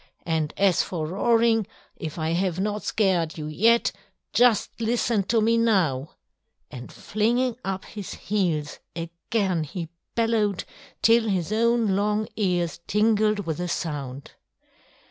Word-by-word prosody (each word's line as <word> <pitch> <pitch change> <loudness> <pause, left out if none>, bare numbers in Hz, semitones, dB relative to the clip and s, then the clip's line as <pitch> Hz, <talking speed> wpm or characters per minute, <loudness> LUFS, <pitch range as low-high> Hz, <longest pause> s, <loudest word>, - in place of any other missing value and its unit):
And 160 -3 0
as 195 -3 +4
for 165 -4 -3
roaring, 225 +4 +2 0.3
if 160 -3 -6
I 160 0 -1
have 180 0 0
not 210 +1 -1
scared 180 -7 0
you 155 - -5
yet, 225 +10 +3 0.4
just 245 -3 +4
listen 230 -1 +1
to 225 +2 +2
me 230 +2 +3
now!" 175 - +1 0.6
And 125 -1 -9
flinging 235 +4 0
up 190 0 -3
his 205 -3 -7
heels 170 -8 -1 0.2
again 170 +2 -1
he 165 +2 -6 0.3
bellowed 225 -4 +1 0.4
till 230 0 +5
his 185 -1 -1
own 230 -2 +2
long 210 +2 0
ears 180 -6 0
tingled 215 0 +2
with 160 -2 -2
the 180 0 -3
sound. 140 -6 -4
195 Hz, 130 wpm, -25 LUFS, 165-225 Hz, 0.6 s, till